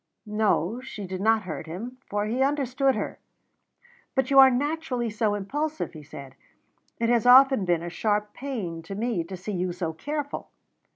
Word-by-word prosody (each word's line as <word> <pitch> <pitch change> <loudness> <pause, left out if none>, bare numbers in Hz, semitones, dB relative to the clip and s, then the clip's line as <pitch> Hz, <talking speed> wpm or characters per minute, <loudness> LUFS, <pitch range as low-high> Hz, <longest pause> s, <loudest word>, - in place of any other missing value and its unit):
No, 210 0 0
she 220 -6 -7
did 185 0 -5
not 220 +1 +3
hurt 165 -2 -6
him, 230 +10 -7
for 205 0 -1
he 235 +5 -1
understood 270 -1 +1
her. 210 - -4 1.0
"But 265 +1 +1
you 275 - +7
are 265 0 +10
naturally 260 -3 -1
so 210 -1 0
impulsive," 295 - -3
he 155 - -9
said, 140 -2 -10 0.6
"it 230 0 0
has 240 -1 +3
often 260 -4 +7
been 175 -2 +1
a 175 - -4
sharp 210 +2 -1
pain 210 -12 -5
to 180 +4 -7
me 220 -4 -1
to 185 +3 -8
see 195 +4 -5
you 180 -1 -1
so 170 -2 -3
careful." 290 - -4
215 Hz, 175 wpm, -26 LUFS, 185-265 Hz, 1.0 s, are